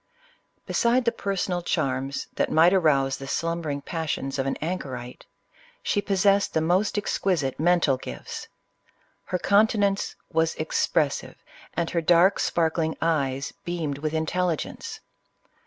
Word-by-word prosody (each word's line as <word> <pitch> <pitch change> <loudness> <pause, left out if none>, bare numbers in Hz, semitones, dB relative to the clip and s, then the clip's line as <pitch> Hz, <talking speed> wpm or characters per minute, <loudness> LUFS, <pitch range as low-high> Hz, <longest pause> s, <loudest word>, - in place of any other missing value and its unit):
Beside 240 +1 +2
the 235 - +3
personal 195 -5 -2
charms 135 -5 -1
that - - 0
might 165 +4 +6
arouse 140 -7 +3
the 135 - -8
slumbering 160 -2 -2
passions 150 -4 -3
of 135 - 0
an 135 - 0
anchorite, 130 -8 -5 0.6
she 205 - +1
possessed 200 0 +2
the - - +4
most 180 +7 +1
exquisite 175 -9 0
mental 165 -5 +3
gifts. - - -7 0.8
Iler 180 - +2
countenance 200 -1 +2 0.2
was 160 0 +2
expressive, 155 -2 0 0.4
and 170 0 -1
her 170 - +1
durk 175 +4 +5
sparkling 160 -1 0
eyes 140 -5 0
beamed 160 -5 -3
with 155 +1 -2
intelligence. 165 +1 -2
165 Hz, 125 wpm, -25 LUFS, 140-185 Hz, 0.8 s, might